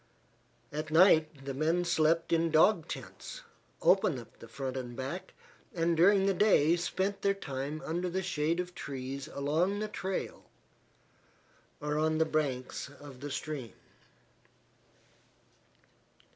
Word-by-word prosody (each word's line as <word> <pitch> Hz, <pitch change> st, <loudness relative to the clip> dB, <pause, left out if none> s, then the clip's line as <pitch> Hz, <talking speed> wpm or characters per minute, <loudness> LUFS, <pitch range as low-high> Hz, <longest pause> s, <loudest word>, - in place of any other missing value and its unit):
At 155 Hz, +1 st, -4 dB
night 155 Hz, -4 st, +4 dB
the 135 Hz, -, -3 dB
men 165 Hz, +5 st, +1 dB
slept 165 Hz, 0 st, +2 dB
in 165 Hz, 0 st, +3 dB
dog 160 Hz, +2 st, +4 dB
tents, -, -, -8 dB, 0.4 s
open 185 Hz, -6 st, +4 dB
at 120 Hz, -, -12 dB
the 115 Hz, -, -11 dB
front 130 Hz, +3 st, -5 dB
and 125 Hz, -2 st, -5 dB
back, 140 Hz, +9 st, -5 dB, 0.4 s
and 170 Hz, 0 st, +2 dB
during 190 Hz, +4 st, +5 dB
the 195 Hz, -, +3 dB
day 175 Hz, -5 st, +4 dB
spent 190 Hz, +3 st, -2 dB
their 200 Hz, 0 st, +2 dB
time 140 Hz, -2 st, -5 dB
under 175 Hz, +3 st, -1 dB
the 190 Hz, +2 st, -2 dB
shade 165 Hz, -1 st, 0 dB
of 180 Hz, 0 st, -3 dB
trees 135 Hz, -1 st, -5 dB
along 160 Hz, +8 st, 0 dB
the 215 Hz, +1 st, -2 dB
trail, 190 Hz, -2 st, -4 dB, 1.3 s
or 150 Hz, +1 st, -1 dB
on 155 Hz, 0 st, +2 dB
the 160 Hz, -, +3 dB
banks 140 Hz, -5 st, -2 dB
of 140 Hz, -2 st, -12 dB
the 145 Hz, +2 st, -6 dB
stream. 140 Hz, -3 st, -5 dB
155 Hz, 130 wpm, -31 LUFS, 140-180 Hz, 1.3 s, during